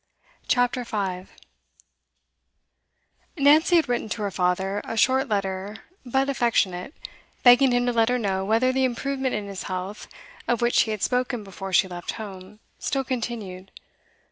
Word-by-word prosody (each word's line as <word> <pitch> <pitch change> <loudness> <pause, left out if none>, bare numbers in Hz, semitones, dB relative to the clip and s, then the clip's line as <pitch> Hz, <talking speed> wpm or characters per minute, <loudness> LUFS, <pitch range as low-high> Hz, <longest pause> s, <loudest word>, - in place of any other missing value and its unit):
CHAPTER 245 0 +1
5 190 -5 -4 2.1
Nancy 305 +5 +5
had 325 -4 +4
written 240 -3 -2
to 215 0 -3
her 200 - -2
father, 190 +2 0
a 225 - -5
short 260 +3 +3
letter 195 0 -2 0.3
but 265 +2 0
affectionate, 235 - 0 0.5
begging 250 +1 +7
him 245 0 +2
to 245 - 0
let 225 0 +3
her 250 - +2
know 195 -5 -1
whether 225 +6 +2
the 265 0 +1
improvement 260 +1 -1
in 210 -1 -3
his 200 -2 -6
health, 185 +3 -5 0.4
of 240 - +1
which 240 0 +3
he - - -1
had 215 -2 -3
spoken 250 -2 0
before 195 0 -8
she 190 +1 +4
left 175 -1 -6
home, 200 -1 -9 0.2
still 270 -1 -1
continued. 225 -7 -5
225 Hz, 150 wpm, -24 LUFS, 195-250 Hz, 2.1 s, begging